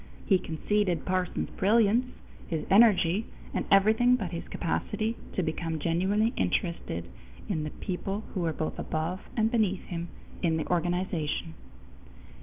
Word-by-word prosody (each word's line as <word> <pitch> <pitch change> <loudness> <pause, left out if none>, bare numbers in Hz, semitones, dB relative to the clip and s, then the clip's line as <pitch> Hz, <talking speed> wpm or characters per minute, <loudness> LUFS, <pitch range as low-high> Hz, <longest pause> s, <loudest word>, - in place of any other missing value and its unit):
He 190 -3 +4
conceded 180 +1 0
Parsons' 185 -1 -1
brilliance, 225 +4 +3 0.4
his 160 -2 -2
energy, 205 -2 +5 0.3
and - - -1
everything 220 +5 +5
but 195 -9 -3
his 170 - -5
capacity 215 +6 -2 0.2
to 185 - 0
become 160 0 -2
genuinely 190 - +1
interested 170 - -1 0.4
in 155 - -1
the - - -3
people 195 +5 -4
who 190 - -2
were 170 -2 +1
both 155 0 -3
above 160 +4 -2 0.2
and 220 0 +3
beneath 210 -6 +1
him 170 -1 -5 0.3
in 165 -3 +2
the 160 - -2
organization. 175 -2 -1
185 Hz, 135 wpm, -29 LUFS, 165-210 Hz, 0.4 s, energy